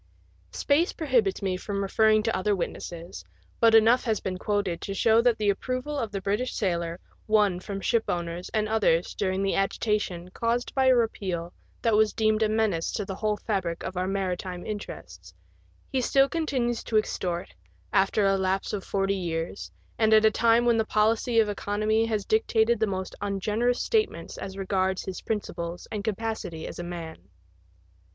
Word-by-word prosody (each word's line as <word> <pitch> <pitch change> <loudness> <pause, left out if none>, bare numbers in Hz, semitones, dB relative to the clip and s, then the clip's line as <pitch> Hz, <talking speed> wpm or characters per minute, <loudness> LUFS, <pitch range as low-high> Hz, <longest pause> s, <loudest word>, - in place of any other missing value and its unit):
Space 305 +5 +1
prohibits 240 - +1
me 185 -1 0
from 200 +1 -3
referring 215 +2 +3
to 225 - 0
other 200 +2 +1
witnesses, 170 - -6 0.4
but 230 -1 +6
enough 225 +3 +5
has 220 -3 +1
been 185 -1 -4
quoted 200 -5 -1
to 195 - -4
show 225 +3 +4
that 235 -1 +3
the 210 -1 +2
approval 255 +7 -3
of 225 -4 -3
the 200 - -3
British 205 +6 -1
sailor 170 -3 -1 0.3
won 210 -4 +3
from 195 +1 -5
shipowners 175 -7 -1
and 215 -1 0
others 205 -6 +2
during 190 -1 -1
the 195 - +1
agitation 195 -3 -1
caused 235 +4 -1
by 265 -1 +2
a 260 - +6
repeal 185 -7 -1 0.3
that 230 -2 +3
was 215 0 +3
deemed 215 0 +1
a 215 - +3
menace 215 -7 0
to 205 - -2
the 195 - -5
whole 210 +2 -1
fabric 185 -7 -2
of 185 - -5
our 180 +1 -1
maritime 185 -2 -3
interests 210 -1 -8 0.6
he 265 -2 +1
still 270 +2 +4
continues 265 -7 -1
to 220 - +1
extort, 175 - -2 0.4
after 195 +2 +3
a 195 0 +3
lapse 190 +1 -1
of 200 -2 -3
forty 195 0 0
years, 165 - -4 0.3
and 220 0 +5
at 215 0 +5
a 220 - +6
time 230 +2 +3
when 235 -1 +4
the 225 - +3
policy 220 +2 +1
of 220 - +4
economy 215 +2 0
has 215 -3 -1
dictated 235 - +2
the 220 - +2
most 190 -1 -4
ungenerous 210 +5 0
statements 440 -2 -1
as 195 0 -6
regards 190 -1 0
his 190 - -5
principles 175 -5 -4
and 210 -2 -3
capacity 220 -6 -3
as - - -7
a - - -3
man. 165 - -8
205 Hz, 175 wpm, -27 LUFS, 185-225 Hz, 0.6 s, but